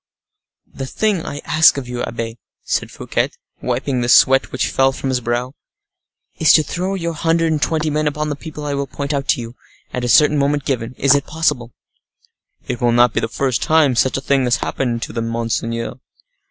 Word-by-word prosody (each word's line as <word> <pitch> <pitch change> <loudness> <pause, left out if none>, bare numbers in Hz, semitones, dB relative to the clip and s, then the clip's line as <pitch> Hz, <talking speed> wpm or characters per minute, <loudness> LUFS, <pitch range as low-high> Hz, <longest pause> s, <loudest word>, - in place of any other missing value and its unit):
"The 135 - -5
thing 205 +2 0
I 145 - -6
ask 155 -2 +5
of 135 -3 -5
you, 125 0 -4
abbe," 115 0 -5 0.2
said - - -1
Fouquet, - - -2 0.3
wiping 125 +1 -1
the 120 - -1
sweat 135 +2 +5
which 130 - -1
fell 135 0 +3
from 135 0 -4
his 130 -1 0
brow, 120 +2 -2 0.9
"is 160 - +5
to 155 - +5
throw 185 +6 -3
your 170 -3 -3
hundred 165 0 +1
and 155 -2 -1
twenty 155 -1 0
men 155 +1 0
upon 150 +1 -2
the 145 - -2
people 150 0 -8
I 145 - -2
will 140 0 -2
point 140 +1 -4
out 140 -1 -2
to - - +2
you, 115 +1 -9 0.4
at 125 - -3
a 120 - -1
certain 150 +2 +5
moment 140 0 0
given—is 130 +1 +1
it 140 -1 0
possible?" 150 -7 -1 1.0
"It 120 - -4
will 120 -1 +3
not 120 -1 +4
be - - +1
the - - -1
first 130 +1 -1
time 155 -5 +3
such 130 +3 +2
a - - -4
thing 135 -1 +1
has 120 -1 +3
happened 120 0 -2
to - - -6
them, 115 0 -2
monseigneur." 115 +1 -3
135 Hz, 205 wpm, -19 LUFS, 120-150 Hz, 1.0 s, ask